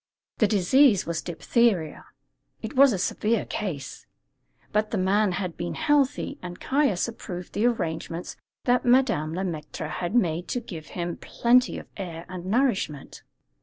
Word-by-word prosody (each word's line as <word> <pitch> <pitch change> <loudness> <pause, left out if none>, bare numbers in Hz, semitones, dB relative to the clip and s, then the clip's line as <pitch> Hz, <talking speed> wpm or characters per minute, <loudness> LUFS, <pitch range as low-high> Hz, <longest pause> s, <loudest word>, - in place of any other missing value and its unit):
The 215 - +5
disease 210 +3 +4
was 165 -1 -2
diphtheria. 175 -1 0 0.6
It 220 +6 -5
was 275 0 +7
a 200 - 0
severe 215 +4 0
case; 150 -11 -5 0.6
but 210 +1 +1
the 215 - -2
man 195 +1 +2
had 180 -2 -3
been 175 - -4
healthy, 295 -3 +1
and 175 -1 -7
Caius 265 -10 +1
approved 180 -6 -7
the 225 +4 +2
arrangements 165 -6 -3 0.3
that 245 0 +3
Madame 235 - +2
Le 190 - -2
Maître 160 -3 -5
had 175 +7 -3
made 175 -6 +1
to 245 - -1
give 170 -10 -9
him 175 -1 -3
plenty 250 +2 +2
of - - -8
air 170 -4 -6
and 185 -1 -7
nourishment. 200 - 0
195 Hz, 150 wpm, -26 LUFS, 170-240 Hz, 0.6 s, was